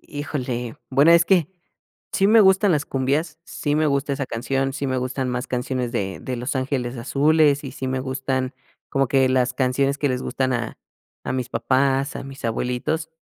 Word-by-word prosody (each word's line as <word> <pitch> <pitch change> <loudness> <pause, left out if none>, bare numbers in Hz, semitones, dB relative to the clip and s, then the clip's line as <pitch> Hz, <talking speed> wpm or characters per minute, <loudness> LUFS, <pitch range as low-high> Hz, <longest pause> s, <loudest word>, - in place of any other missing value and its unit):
Híjole, 125 -5 -4
bueno, 140 +5 +5
es 170 0 +6
que 175 -4 +3 0.6
sí 195 - +3
me 220 +2 +6
gustan 190 -1 +5
las 145 -1 +1
cumbias, 145 +4 -1
sí 145 -1 -2
me 155 0 +2
gusta 140 0 0
esa 140 0 -2
canción, 135 +3 -1
sí 140 0 -3
me 130 -1 0
gustan 130 +1 -2
más 125 +1 -2
canciones 125 -1 -2
de 95 -5 -2
de 130 -1 -4
Los 125 +3 -3
Ángeles 130 -2 -2
Azules 145 +3 +3
y 135 - -6
sí 130 - -5
me 130 0 -1
gustan 130 0 -2 0.4
como 135 -2 +1
que 135 -1 +3
las 130 -1 +1
canciones 135 +2 +1
que 145 - +1
les 125 0 -2
gustan 130 -1 -1
a 120 -2 -3 0.5
a - - -1
mis 130 -1 -2
papás, 135 +2 +1
a - - -5
mis 135 -1 -10
abuelitos, 125 +8 -1
135 Hz, 190 wpm, -23 LUFS, 130-145 Hz, 0.6 s, es